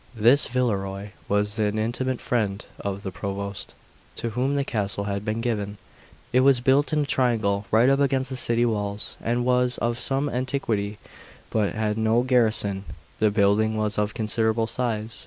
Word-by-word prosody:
1 110 - -7
This 130 +5 +6
Villerois 100 -5 -2 0.2
was 105 +1 0
an 105 0 +1
intimate 120 +3 -1
friend 105 -4 -1
of 100 0 -4
the 95 - -4
Provost, 100 +2 -5 0.4
to 115 - -3
whom 130 +5 0
the 140 - +1
castle 100 -4 -2
had 100 0 -3
been 110 +1 -2
given. 105 -4 -2 0.6
It 125 - +5
was 135 -1 +5
built 135 +3 +3
in 150 -1 +2
a - - -3
triangle, 110 -7 +1
right 115 +3 +4
up 135 +1 +4
against 135 -1 +1
the - - -2
city 120 -1 +3
walls, 105 -2 -2
and 120 +1 0
was 125 0 +2
of 120 0 -1
some 135 +1 +1
antiquity, 125 -6 -2 0.5
but 105 -2 0
had 110 0 -1
no 110 +2 +3
garrison. 110 -6 +1 0.4
The 110 - +4
building 105 +1 +2
was 105 -1 -1
of 105 0 -1
considerable 110 0 0
size. 115 -2 -3
110 Hz, 175 wpm, -25 LUFS, 105-125 Hz, 0.6 s, This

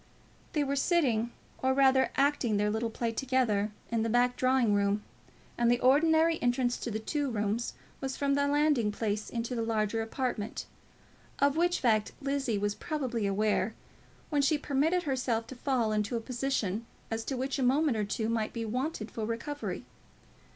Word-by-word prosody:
They 300 - +2
were 280 0 -1
sitting, 265 -7 +2 0.3
or 260 0 +2
rather 265 -1 +4
acting 275 -6 +2
their 210 +1 +1
little 225 +2 -1
play 230 +1 -2
together, 230 -4 +1 0.2
in 230 -1 +1
the 225 - 0
back 245 +2 +3
drawing 255 -4 +3
room, 205 +1 +1 0.6
and 235 -1 +4
the 240 0 +3
ordinary 320 +5 +4
entrance 245 0 +1
to - - -4
the 220 - -2
two 280 +6 -2
rooms 215 0 -1 0.3
was 265 -1 -4
from 280 -1 +1
the 285 0 +2
landing 290 -7 +2
place 210 0 -2
into 235 +1 -3
the 235 - -1
larger 225 -1 0
apartment; 225 -2 -3 0.7
of 280 0 +3
which 350 +2 +2
fact 215 -4 +2
Lizzie 275 -5 -1
was 205 0 0
probably 255 -7 -2
aware, 210 +1 +1 0.6
when 290 -2 +3
she 290 +2 +3
permitted 300 +5 +1
herself 250 -6 -1
to 260 - -9
fall 245 -3 0
into 215 +2 0
a - - -1
position 230 -3 -2 0.2
as 225 0 -2
to 265 - -2
which 265 +2 -2
a - - 0
moment 270 +2 +3
or 215 - 0
two 220 +2 -2
might 225 -1 -1
be 230 -1 -3
wanted 245 0 -3
for 225 - -4
recovery. 285 +6 -4
245 Hz, 175 wpm, -30 LUFS, 220-275 Hz, 0.7 s, rather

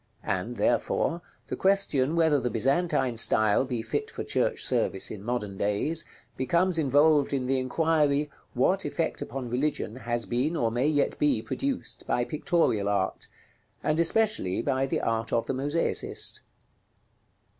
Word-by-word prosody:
And, 100 +6 -2
therefore, 145 +9 +1 0.2
the - - -4
question 170 -7 +1
whether 160 -3 +3
the 125 -1 -1
Byzantine 130 +1 +1
style 110 +1 +3
be 120 -4 -3
fit 110 - -3
for - - -6
church - - 0
service 95 - 0
in 105 - -7
modern 105 -4 -3
days, 105 +11 0 0.3
becomes 170 +7 +1
involved 145 0 +3
in 130 -2 0
the 130 +1 +1
inquiry, 150 +1 +1 0.2
what - - +2
effect - - -2
upon 125 -2 -5
religion 130 -3 -1
has 120 -2 -2
been 130 +7 0
or 115 -7 +1
may 125 +5 +1
yet 145 -2 +1
be 145 -7 +2
produced 275 -1 -3
by 120 - +1
pictorial 150 - +1
art, 95 -2 -1 0.6
and 155 +1 +1
especially 170 - +2
by 135 -1 0
the - - -1
art 115 0 -1
of 115 - +1
the - - -2
mosaicist? 145 +5 -1
135 Hz, 145 wpm, -27 LUFS, 115-155 Hz, 0.6 s, whether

